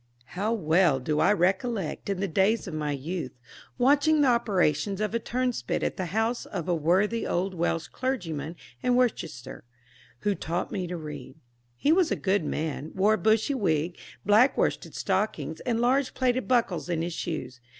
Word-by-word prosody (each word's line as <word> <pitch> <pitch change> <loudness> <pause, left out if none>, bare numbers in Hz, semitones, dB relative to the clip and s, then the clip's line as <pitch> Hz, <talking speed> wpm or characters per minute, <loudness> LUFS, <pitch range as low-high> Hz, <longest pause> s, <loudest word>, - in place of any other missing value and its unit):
How 205 +5 -1
well 165 -7 +3
do 150 +4 -1
I - - +4
recollect, 195 0 0
in 195 -1 -1
the 195 - 0
days 195 +6 +2
of 180 - -6
my 150 -1 -2
youth, 155 +2 -4 0.4
watching 290 +4 +4
the 275 - +5
operations 195 -5 +1
of 215 0 -1
a 230 - +1
turnspit 245 - -2
at - - -1
the 185 - -3
house 225 +6 -1
of 170 - -5
a 180 - +2
worthy 185 +8 +1
old 185 +2 -1
Welsh 165 -1 -1
clergyman 170 - -3 0.3
in 250 -1 +2
Worcestershire, 215 - -1 0.6
who 205 - +1
taught 170 -2 -3
me 185 -2 -3
to 175 0 -4
read. 150 -4 -8 0.4
He 285 - +2
was 350 0 +4
a - - +1
good 195 -2 +1
man, 155 0 -3
wore 200 +3 +4
a - - +2
bushy 220 +8 +2
wig, 175 - 0 0.3
black 215 +7 +5
worsted - - -1
stockings, - - -1
and 230 -2 +1
large 255 +3 +2
plated 255 -1 +1
buckles 230 -9 +1
in 165 -2 0
his 170 0 -3
shoes. 155 -7 -5
190 Hz, 175 wpm, -27 LUFS, 165-235 Hz, 0.6 s, the